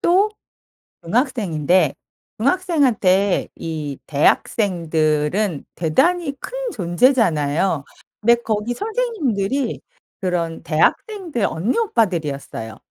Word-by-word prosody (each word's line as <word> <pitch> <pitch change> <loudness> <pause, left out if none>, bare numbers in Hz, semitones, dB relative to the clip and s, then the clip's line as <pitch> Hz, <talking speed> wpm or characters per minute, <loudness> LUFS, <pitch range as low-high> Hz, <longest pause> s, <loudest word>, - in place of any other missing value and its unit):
또 385 +5 +3 0.7
중학생인데 185 - +1 0.4
중학생한테 245 - +2
이 155 -4 -5
대학생들은 160 +1 +1
대단히 290 - +1
큰 - - -8 0.2
존재잖아요. 175 - +2 0.4
근데 235 +2 +5
거기 220 +2 -1
선생님들이 285 - -1 0.4
그런 170 -3 -2
대학생들 310 - 0
언니 185 - -1
오빠들이었어요. 165 - -1
200 Hz, 235 characters per minute, -20 LUFS, 160-270 Hz, 0.7 s, 근데